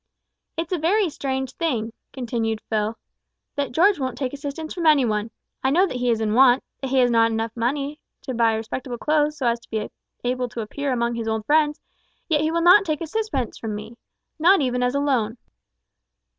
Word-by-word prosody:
"It's 330 +1 -3
a 355 - 0
very 365 +3 +2
strange 265 -2 -3
thing," 235 -9 -2 0.2
continued 230 -4 -2
Phil, 215 0 -2 0.6
"that 285 -3 -2
George 365 +6 +4
won't 260 -2 -3
take 265 -2 -3
assistance 285 +3 -5
from 340 -3 -1
any 295 -4 +6
one. 215 0 -1 0.3
I 265 - +3
know 350 +7 +4
that 300 - -4
he 250 0 0
is 230 -2 +2
in 215 -1 0
want 255 +1 +6 0.2
that 270 - -3
he 270 - +1
has 245 -1 +4
not 230 -1 +4 0.3
money 265 +5 0
enough 295 +1 -9 0.3
to 260 - -4
buy 230 -2 +3
respectable 240 +3 -4
clothes 300 +3 +1
so 265 - -3
as 235 0 +2
to - - -22
be 215 -1 -3 0.3
able 250 0 -1
to 235 - -5
appear 280 +6 -3
among 235 -1 0
his 230 -1 -4
old 220 -1 -1
friends, 300 +1 +3 0.5
yet 305 -3 +2
he 310 - +1
will 335 +1 0
not 365 +4 +8
take 310 -4 -2
a - - -2
sixpence 320 - -2
from 220 -2 -4
me 215 +3 -8 0.4
not 370 +5 +6
even 250 -3 0
as 250 +2 +1
a - - +2
loan." 250 -5 0
260 Hz, 210 wpm, -23 LUFS, 230-300 Hz, 0.6 s, not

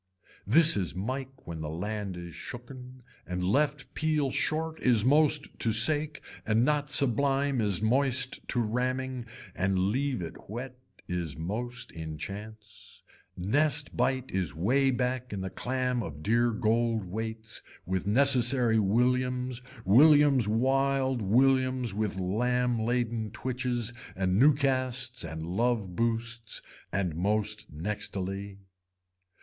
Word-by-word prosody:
This 160 +9 +10
is 90 -3 -1
mike 130 +7 -6
when 80 -2 -7
the 75 - -5
land 100 +3 -5
is 85 -1 -9
shooken 125 +1 -10 0.2
and 90 0 -4
left 140 +8 -1
peel 155 -4 0
short 160 +3 -2
is 120 -4 +3
most 150 +1 +2
to 115 - +3
sake 150 +7 +3 0.2
and 110 +2 +1
not 150 -1 0
sublime 140 -1 +1
is 100 -1 +1
moist 130 +2 +1
to 120 - 0
ramming 125 +2 -3 0.3
and 95 +1 -1
leave 120 +4 -1
it 80 - -10
whet 125 +4 -7 0.3
is 85 -4 -4
most 120 +9 -4
in 80 -2 -7
chance. 100 +1 -9 0.3
Nest 145 +9 0
bite 130 -1 -1
is 90 -6 -2
way 130 - +1
back 125 0 -2
in 100 -2 -5
the 95 0 -5
clam 125 -1 -2
of 75 -7 -8
dear 120 +4 +2
gold 115 -1 0
weights 110 +3 -6 0.2
with 95 +1 -3
necessary 125 -1 +6
williams 125 +4 0 0.2
williams 140 - +5
wild 135 +2 0
williams 130 +2 +2
with 105 -2 -3
lamb 120 +5 0
laden 115 -1 -2
twitches 120 0 -2 0.2
and 95 +1 0
new 145 +3 +5
casts 130 -2 -1
and 80 0 -6
love 100 +1 -2
boosts 115 0 -1 0.3
and 90 -3 -2
most 105 +4 -1
nextily. 95 +3 -5
120 Hz, 125 wpm, -28 LUFS, 100-130 Hz, 0.3 s, This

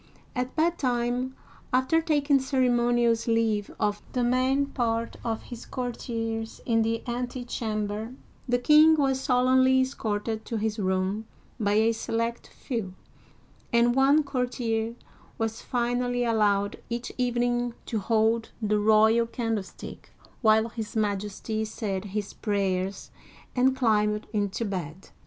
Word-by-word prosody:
At 250 0 -2
bedtime, 255 -6 0 0.4
after 260 +6 +3
taking 290 -3 +2
ceremonious 240 -3 +2
leave 225 -3 +1
of 205 0 0
the 250 - +1
main 255 +3 +2
part 230 -4 -2
of 225 -2 -2
his 240 -1 -9
courtiers 225 -3 -4
in 225 -2 +2
the 225 +1 -1
antechamber, 235 -2 -3 0.3
the 245 - +3
king 305 +5 +6
was 270 -3 +1
solemnly 260 +1 +4
escorted 220 -4 -2
to 230 - -3
his 215 0 -2
room 190 +3 -1 0.3
by 205 -2 +1
a 220 +2 +4
select 230 +1 -2
few; 220 -8 -5 0.8
and 235 +1 +4
one 275 +4 +4
courtier 240 -4 -2 0.4
was 225 0 -2
finally 245 0 0
allowed 205 -3 +1
each 235 +1 -4
evening 245 -1 0
to 225 - -2
hold 225 +2 +1
the 210 -2 +1
royal 220 +2 +4
candlestick 225 -5 -5 0.3
while 220 0 +4
his 220 -1 -6
Majesty 210 +1 -1
said 210 -3 -3
his 205 0 -4
prayers 195 -2 -2 0.4
and 260 +1 +3
climbed 210 -4 +2
into 205 +2 -1
bed! 185 -3 -5
230 Hz, 120 wpm, -27 LUFS, 215-250 Hz, 0.8 s, king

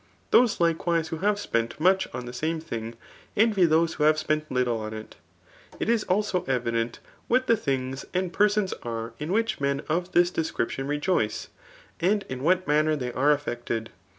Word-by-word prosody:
Those 235 -4 +5
likewise 165 -1 +1
who 160 - -3
have 205 +2 +2
spent 115 - -2
much 190 +3 +3
on 125 0 -5
the 120 - -7
same 160 +6 -1
thing, 115 -7 -6 0.4
envy 210 -4 +4
those 165 +1 +3
who - - -2
have 155 +1 +5
^sp^nt 155 0 -1
little 125 -3 0
on 110 0 -5
it. 110 0 -9 0.6
It - - -1
is 230 -2 +2
^ilsd 185 -5 0
evident 115 -2 0 0.3
what 255 +2 +2
the 230 - +4
things 135 -6 -2
and 185 -1 -1
persons 210 -2 +2
are 115 -1 -5
in^whicbmen 150 -6 -1
of 175 +3 -1
this 175 0 +4
ddsoriptipn 135 -5 -2
rejoice, 145 - 0 0.5
smd 200 +4 +2
m 130 -1 -4
what' 185 +5 +2
manner 155 +1 +3
they 125 -4 -4
are 145 +3 +3
slffecibed. 120 -5 -4
155 Hz, 170 wpm, -26 LUFS, 125-185 Hz, 0.6 s, Those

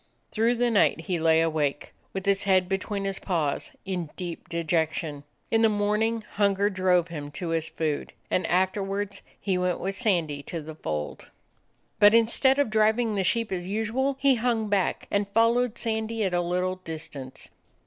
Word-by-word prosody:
Through 230 +2 +2
the 240 0 +1
night 210 - +3
he 180 -4 -2
lay 160 0 +4
awake, 155 -3 -1 0.2
with 190 -1 -5
his 200 0 +2
head 185 -2 +3
between 195 +1 -2
his 195 -1 -1
paws, 160 -7 -1
in 180 -5 -3
deep 175 -1 -6
dejection. 160 -3 -1 0.3
In 225 - +3
the 225 - +5
morning 215 +2 0
hunger 200 0 +2
drove 180 -2 +2
him 150 -3 -6
to 170 +3 -4
his 165 -1 -1
food, 155 -3 -2 0.2
and 185 - +1
afterwards 195 +2 0 0.2
he 190 -2 0
went 180 -1 0
with 195 +1 -2
Sandy 170 -10 0
to 165 +3 -6
the 155 +1 -8
fold. 75 - -5 0.7
But 210 +1 +7
instead 240 +4 +4
of 285 -6 +1
driving 220 +1 +2
the 195 -2 0
sheep 230 +4 0
as 180 -1 -3
usual, 225 +7 -1
he 275 0 +5
hung 230 -3 0
back, 200 -2 0
and 200 0 0
followed 230 +1 +3
Sandy 220 -1 -1
at 190 -2 0
a 175 - +2
little 180 +1 -1
dis 165 -3 -6
tance. 130 -2 -9
195 Hz, 175 wpm, -26 LUFS, 170-220 Hz, 0.7 s, But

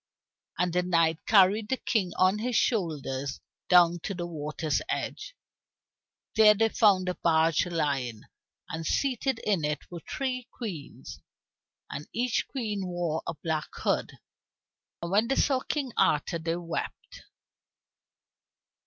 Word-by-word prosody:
And 180 0 0
the 180 - +3
knight 165 -3 +2
carried 210 +1 +5
the 265 - +1
King 200 -9 0
on 185 +3 +3
his 245 +2 -2
shoulders 145 - -1 0.3
down 175 -1 +6
to 195 +4 -4
the 175 -1 -3
water's 150 -2 -2
side. - - -2 1.2
There 215 -1 +7
they 225 +2 +2
found 200 -5 +3
a 180 - 0
barge 165 0 +2
lying, 140 -9 -2 0.4
and 160 0 -5
seated 265 - 0
in 195 -7 +1
it 150 0 -1
were 175 - -6
three 255 -2 -3
queens, 185 - -7 0.7
and 145 - -6
each 245 0 0
queen 210 -7 -3
wore 175 -3 -2
a - - -3
black 160 -2 -1
hood. - - -1 0.9
And 170 - -4
when 210 +4 +3
they 270 - +1
saw 270 -2 +2
King 270 -1 -3
Arthur 155 +3 +2
they 165 +1 -1
wept. 170 -1 -6
180 Hz, 135 wpm, -28 LUFS, 160-220 Hz, 1.2 s, There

